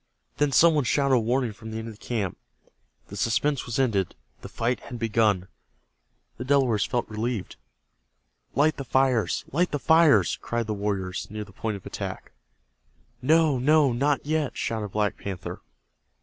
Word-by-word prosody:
Then 145 -1 +2
some 165 +5 +6
one 150 -2 +2
shouted 140 +1 +2
a 125 - +5
warning 120 0 0
from 110 +2 -10
the 110 - -5
end 110 0 -5
of 110 -1 -12
the - - -18
camp. 105 -7 -2 0.7
The 100 - -8
suspense 125 +7 0
was 120 - -3
ended. 110 -9 +1 0.3
The - - -9
fight 120 +2 -1
had 120 - -8
begun. 110 -5 +1 0.9
The 125 - -5
Delawares 130 -6 +2
felt 120 -1 -1
relieved. 110 -1 -3 1.0
"Light 150 +4 +3
the 140 - -4
fires! 130 -3 +1
Light 175 +5 +1
the 145 - -1
fires!" 145 - +4
cried 120 0 -2
the 110 - -2
warriors 100 -3 -3
near 105 0 -5
the 105 - -15
point 110 +1 -3
of 95 - -16
attack. - - -6 0.9
"No, 155 0 +3
no, 145 0 +4
not 140 +4 0
yet!" 155 -2 -1
shouted 110 -2 -2
Black 105 +1 -1
Panther. 95 -3 -6
120 Hz, 165 wpm, -26 LUFS, 105-140 Hz, 1.0 s, some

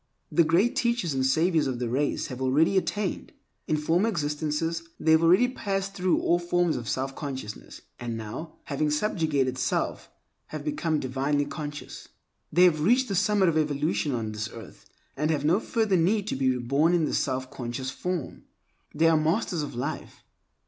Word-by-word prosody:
The 170 - +5
Great 175 +9 +2
Teachers 235 - 0
and 130 -1 0
Saviors 160 +4 +2
of 130 -2 -2
the 120 0 -2
race 135 +5 0
have 130 -3 -7
already 145 +8 +3
attained. 195 +1 -1 0.3
In 155 - +1
former 170 +8 +2
existences 155 -1 -1 0.2
they 160 - +2
have 160 0 +6
already 180 +9 +5
passed 195 -5 -3
through 180 -2 +1
all 175 - +2
forms 175 -1 +1
of 120 - -5
selfconsciousness, 135 -4 -5 0.2
and 120 -2 -4
now, 115 +9 -7
having 150 +1 -1
subjugated 150 -6 0
self, - - -1 0.4
have 155 -1 -7
become 155 +1 0
divinely 140 +2 0
conscious. 145 -1 -7 0.4
They 175 +4 +5
have 160 -4 +4
reached 245 +8 +3
the 195 - -1
summit 205 0 +3
of 160 -2 +2
evolution 150 0 0
on 110 -2 -3
this 110 +1 -4
earth, 115 -4 -12 0.3
and 150 +2 0
have 150 -2 0
no 175 +6 +4
further 220 -5 +1
need 195 +5 +2
to - - -1
be 130 0 +1
reborn 140 +7 +2
in 165 -3 +2
the - - -3
self 130 -1 -1
conscious 130 0 -4
form. 180 -1 -4 0.5
They 165 +2 +4
are 165 - +5
Masters 165 +2 0
of 145 - -5
Life. 140 +5 -5
155 Hz, 175 wpm, -27 LUFS, 135-175 Hz, 0.5 s, have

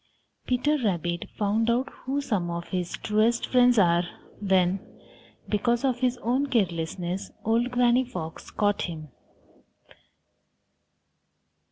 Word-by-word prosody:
Peter 290 +4 +1
Rabbit 175 -4 -1
found 215 +2 +1
out 250 +3 +1
who 275 +2 -3
some 200 -10 -1
of 170 0 -5
his 180 -2 -2
truest 220 +3 +1
friends 245 -1 +4
are 175 -3 +5 0.4
when, 190 -2 +2 0.7
because 235 +4 +1
of 250 -2 +1
his 250 -1 +1
own 255 +5 +1
carelessness, 180 -4 -1 0.2
old 230 +3 +2
Granny 245 0 +3
Fox 175 -11 -7
caught 205 -1 0
him. 155 -4 -5
215 Hz, 115 wpm, -26 LUFS, 180-245 Hz, 0.7 s, are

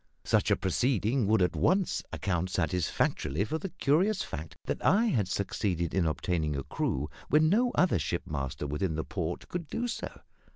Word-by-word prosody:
Such - - +2
a - - +5
proceeding 110 +4 +1
would 110 -2 +4
at 90 - 0
once 190 0 +2
account 90 -2 -1
satisfactorily 90 -1 0
for 160 +8 -2
the 195 - -4
curious 180 +8 +2
fact 75 0 -7
that - - -3
I 205 +8 +4
had 115 - +1
succeeded 95 -3 -1
in 95 -4 +2
obtaining 75 0 -1
a 70 - -3
crew 70 +2 -2 0.2
when 155 +1 +5
no 240 +7 +3
other 180 - +3
shipmaster 70 -1 -3
within 75 +4 -1
the 80 - -1
port 90 -5 -4
could 175 -3 -4
do 240 +10 -2
so. 235 - -5
95 Hz, 170 wpm, -30 LUFS, -, 0.2 s, a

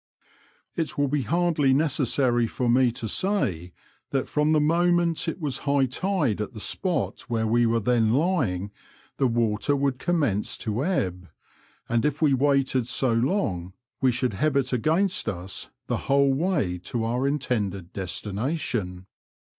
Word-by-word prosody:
It 155 -3 -2
will 145 0 +2
be 145 0 0
hardly 155 -1 +2
necessary 135 -5 +2
for 125 +2 -2
me 125 +1 +4
to 115 - -5
say 100 - 0 0.4
that 135 -2 -1
from 150 +1 +1
the 155 - +4
moment 170 +2 +2
it 165 - -3
was 150 -5 -1
high 140 -1 +2
tide 140 - -1
at 105 - -5
the 110 - -8
spot 180 - -1
where 115 -1 0
we 120 +2 +3
were 115 0 +2
then 115 0 +2
lying 120 - 0 0.5
the 135 - +2
water 115 +3 +1
would 135 -2 0
commence 145 - 0
to 110 +4 -2
ebb, 90 - -2 0.6
and 115 -1 +1
if 150 0 0
we 150 -3 +3
waited 135 -2 +2
so 125 -1 +1
long 115 - -1 0.3
we 130 -1 +4
should 125 -1 -1
have 145 +9 0
it 135 -2 +1
against 160 - +1
us 95 -1 -5 0.2
the - - -1
whole 140 0 +4
way 140 - 0
to 110 +6 -4
our 125 +4 0
intended 105 - -2
des 95 - -4
tination. 105 - -3
130 Hz, 155 wpm, -25 LUFS, 110-150 Hz, 0.6 s, me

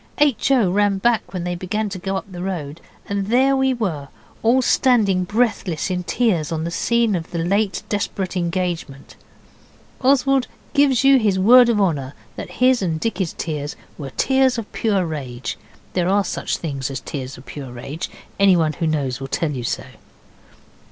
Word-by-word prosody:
H. 290 -4 +2
O. 240 -9 +3
ran 205 0 +2
back 235 +3 +1
when 180 -2 -4
they 180 0 -2
began 190 +5 -2
to 190 -1 -6
go 195 +1 -2
up - - -5
the 175 -1 -7
road, 165 -5 -4 0.3
and 200 -1 -2
there 260 +4 +3
we 265 0 +2
were, 180 - -2 0.3
all 250 +3 +3
standing 210 -9 +3
breathless 205 -5 0
in 180 0 -1
tears 180 -5 0
on 160 -1 -2
the 170 - -3
scene 235 +3 +1
of 165 -2 -4
the 170 - -5
late 195 +4 0
desperate 195 -2 -2
engagement. 170 -5 -3 0.9
Oswald 270 0 +3 0.3
gives 280 -3 +3
you 270 -1 +6
his 205 -4 +1
word 240 +5 +7
of 225 -3 +2
honour 145 -8 0 0.2
that - - -7
his 255 -2 +5
and 165 -4 -1
Dicky's 190 -4 -2
tears 150 -2 -4 0.2
were 140 -2 -7
tears 265 -2 +3
of 225 -2 -6
pure 200 -5 +1
rage. 135 -6 -5 0.4
There 180 -1 +1
are 200 +1 +3
such - - -2
things 140 -5 -4
as 135 -2 -4
tears 135 -2 -6
of 125 - -14
pure 135 0 -8
rage. 140 +8 -6 0.3
Anyone 175 -6 +4
who 165 +2 -2
knows 140 -5 -1
will 135 - -5
tell 155 +3 -1
you 130 -4 -4
so. - - -2
185 Hz, 180 wpm, -21 LUFS, 160-230 Hz, 0.9 s, word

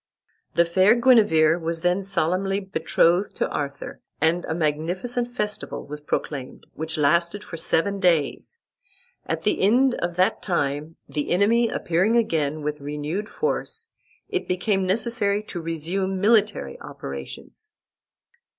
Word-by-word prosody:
The 170 - +5
fair 185 +6 +4
Guenever 210 -10 +4
was 165 0 -2
then 180 +2 +1
solemnly 190 +1 0
betrothed 180 0 +1
to - - 0
Arthur, 140 -1 -5 0.2
and 165 +3 +1
a 160 - -3
magnificent 180 +11 -1
festival 210 -3 -3
was 150 +1 -7
proclaimed, 145 -2 -4
which 160 +1 -3
lasted 170 +7 +2
seven 195 +5 +1
days. 175 - +1 0.7
At - - -2
the - - +1
end 245 +6 +4
of 175 -6 -3
that 185 +2 +2
time, 155 -3 -2
the 150 -2 -3
enemy 225 +6 +3
appearing 190 +7 +1
again 155 -9 0
with 150 0 -3
renewed 150 +8 -4
force, 460 -1 -3 0.4
it 385 -3 -3
became 190 +1 0
necessary 210 0 0
to 175 -5 -6
resume 175 +4 -2
military 210 - +2
operations. 70 0 -8
180 Hz, 125 wpm, -24 LUFS, 160-210 Hz, 0.7 s, The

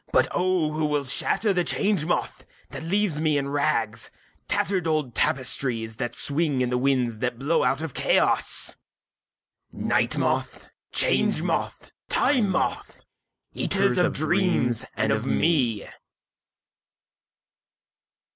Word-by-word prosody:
(But - - +4
O 180 -4 +1
who 155 0 -1
will 150 -1 0
shatter 200 - 0
the 180 -1 +1
Change 195 -4 0
Moth 175 - -2 0.3
that - - -7
leaves 175 -2 0
me 155 -2 +2
in 140 0 -2
rags—tattered 145 - -2
old 155 -6 -1
tapestries 115 -3 -1
that 120 0 -3
swing 145 -2 0
in 125 -1 0
the 125 - +1
winds 125 -4 0
that 125 -1 -2
blow 145 +6 +1
out 135 +5 0
of 160 - -5
Chaos!)Night - - -2
Moth, - - -2 0.2
Change - - +2
Moth, - - -3 0.2
Time 245 -8 +2
Moth, 190 - -2 0.5
eaters - - +1
of - - +2
dreams 125 0 +1
and 110 0 0
of 110 +4 -1
me! 125 -13 +1
145 Hz, 120 wpm, -25 LUFS, 125-165 Hz, 0.5 s, But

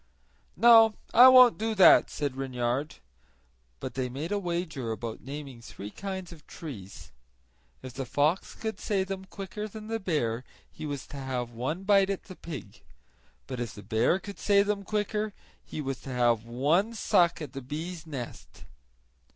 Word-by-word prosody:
"No, 225 0 +7 0.2
I 245 +3 +10
won't 255 -3 +8
do 220 0 -1
that," 190 - +7
said 145 -3 -3
Reynard. 130 +2 -2 0.8
But - - -6
they 130 -1 -2
made 145 +8 -5
a 205 - +1
wager 170 - -3
about 110 0 -5
naming 135 -3 -8
three 105 -3 -9
kinds 190 - -6
of 160 -4 -14
trees. 105 - -9 0.7
If 130 -1 -8
the 135 -1 -5
fox 150 +8 0
could 220 -1 -5
say 195 -3 0
them 190 0 -6
quicker 200 +2 -6
than 215 +1 -10
the 225 0 -1
bear 130 - -1 0.3
he 155 - -7
was 140 -2 -5
to 145 - -10
have 130 -3 -3
one 130 +10 -3
bite 195 -1 +4
at 195 - -2
the 185 - -11
pig; 155 - -9 0.6
but 130 -2 -6
if 120 -2 -4
the 105 - -10
bear 110 - +2
could 200 +1 -9
say 200 -1 +4
them 205 0 -1
quicker 210 +1 -2 0.3
he 155 - -6
was 135 -2 -4
to - - -9
have 120 -3 +2
one 155 - +1
suck 180 -6 +3
at 150 -5 -7
the 135 - -6
bee's 160 +5 -6
nest. 130 -6 -8
155 Hz, 170 wpm, -28 LUFS, 130-200 Hz, 0.8 s, I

